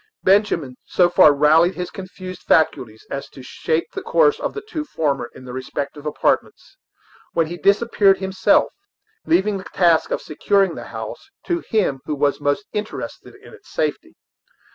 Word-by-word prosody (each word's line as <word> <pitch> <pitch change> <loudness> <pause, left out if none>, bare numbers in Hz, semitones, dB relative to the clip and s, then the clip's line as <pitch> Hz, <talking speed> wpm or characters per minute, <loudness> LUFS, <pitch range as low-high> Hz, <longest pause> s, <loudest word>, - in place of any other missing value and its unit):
Benjamin 185 -10 +2
so 175 -1 +2
far 150 - +7
rallied 155 +5 +4
his 180 -1 -5
confused 185 -2 -9
faculties 115 -8 +1
as 140 - -5
to 130 - -13
shape 160 +5 -1
the 385 - -4
course 465 0 +3
of - - -3
the 425 - -5
two 320 -8 -4
former 140 - -2
to - - -12
their 125 -1 -9
respective 140 +3 -5
apartments, 150 - -1 0.6
when 165 - +2
he 170 +2 -6
disappeared 200 0 +3
himself, 190 0 +2 0.5
leaving 210 - +2
the 185 - -10
task 170 -3 +3
of - - -1
securing 195 +3 +1
the - - -8
house - - -8 0.2
to 345 -1 0
him 195 - +1
who 150 - -2
was 145 0 0
most 145 +8 0
interested 210 0 -6
in - - -14
its - - -17
safety. - - -3
175 Hz, 165 wpm, -21 LUFS, 145-200 Hz, 0.6 s, far